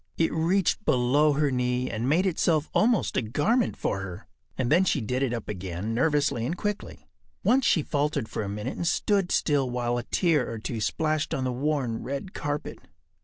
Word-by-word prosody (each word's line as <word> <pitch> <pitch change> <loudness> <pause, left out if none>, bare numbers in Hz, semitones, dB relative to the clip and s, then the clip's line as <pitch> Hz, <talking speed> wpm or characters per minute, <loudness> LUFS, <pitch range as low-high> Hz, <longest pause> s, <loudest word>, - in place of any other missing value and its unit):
It 165 - +1
reached 170 +3 +1
below 140 +5 +3
her 145 0 +1
knee 125 0 0
and 115 +4 -2
made 170 +6 +3
itself 165 -4 +1
almost 225 -1 +2
a - - +3
garment 180 - +1
for 100 - -1
her. 95 +1 -7 0.3
And 130 0 -1
then 175 +4 +5
she 170 - +1
did 125 +3 -2
it 135 -3 +1
up 115 -3 -4
again 95 +2 -4
nervously 140 -2 +1
and 165 +9 -2
quickly. 210 +1 -4 0.4
Once 260 0 +3
she 160 - +3
faltered 145 -5 -1
for - - -4
a 100 - -3
minute 105 +5 -4
and 170 - -2
stood 195 0 +1
still 140 -4 +2
while 120 0 -1
a - - -5
tear 165 -8 +1
or 115 - -4
two 110 +1 -4
splashed 155 +5 0
on 130 - -2
the 130 - 0
worn 130 -3 -1
red 140 +8 -5
carpet. 145 0 -4
140 Hz, 195 wpm, -27 LUFS, 120-160 Hz, 0.4 s, then